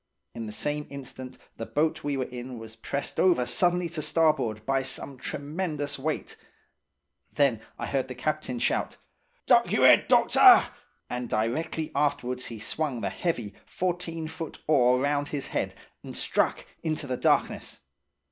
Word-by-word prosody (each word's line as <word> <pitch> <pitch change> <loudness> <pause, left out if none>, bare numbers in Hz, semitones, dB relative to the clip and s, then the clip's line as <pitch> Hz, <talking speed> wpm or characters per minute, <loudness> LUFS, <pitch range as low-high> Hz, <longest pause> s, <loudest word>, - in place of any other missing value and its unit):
"In 115 -1 -6
the - - -5
same 150 +6 -2
instant 130 -2 -8 0.2
the 115 - -4
boat 155 +1 0
we 145 -1 -1
were 130 - 0
in 125 0 -7
was 110 0 -10
pressed 140 +5 -4
over 175 -10 +4
suddenly 175 +4 +2
to 160 -1 -4
starboard 150 -9 +1
by 135 0 +1
some 135 +1 -5
tremendous 145 +2 -4
weight. 155 +3 -3 0.9
Then 135 -6 +2 0.2
I - - -4
heard 135 -2 -1
the 130 - -7
captain 140 -1 -2
shout, - - -1 0.5
'Duck - - +4
y'r - - +4
head, - - +7
doctor!' - - +7 0.4
And 125 -1 -4
directly 155 +8 -1
afterwards 140 -3 0
he 115 - -7
swung 130 +3 -2
the 100 -2 -2
heavy, 120 - -2
fourteen 175 -3 -3
foot 160 0 -7
oar 125 -4 +4
round 145 +1 0
his 145 -2 -4
head, - - -2 0.3
and - - -6
struck - - 0 0.2
into 155 -2 -2
the 130 -2 -2
darkness. - - 0
140 Hz, 155 wpm, -27 LUFS, 125-155 Hz, 0.9 s, head